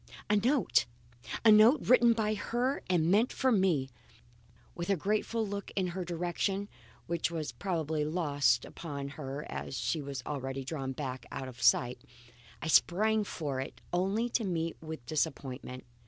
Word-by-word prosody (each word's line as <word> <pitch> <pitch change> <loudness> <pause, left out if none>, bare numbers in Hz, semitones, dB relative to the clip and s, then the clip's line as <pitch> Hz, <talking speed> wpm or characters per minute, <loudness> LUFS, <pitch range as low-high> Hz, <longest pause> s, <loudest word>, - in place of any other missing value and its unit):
A - - +5
note! 245 +5 +3 0.6
A 220 - +9
note 220 +7 +6
written 240 -1 +6
by 215 -2 0
her 240 +6 -1
and 170 -2 +3
meant 220 +5 +4
for 260 -1 +1
me! 185 - +2 0.9
With 170 +1 -5
a 200 - +4
grateful 215 +5 0
look 200 0 -5
in 185 -2 0
her 185 0 -3
direction 180 +4 -2 0.4
(which 170 -1 -1
was 160 -3 -3
probably 160 -5 -2
lost 145 -6 +2
upon 140 -4 -6
her 140 0 -6
as 135 - -5
she 160 - -1
had 140 -2 -5
already 135 -2 -4
drawn 135 -2 -3
back 130 -2 -5
out 130 - -5
of 125 -2 -10
sight), 120 +1 +3 0.6
I - - -2
sprang 210 +7 +4
for 145 -9 -4
it 135 - -7
only 195 +6 +1
to 230 - 0
meet 165 -4 -1
with 160 -6 -7
disappointment. 130 -3 -3
170 Hz, 155 wpm, -31 LUFS, 140-205 Hz, 0.9 s, A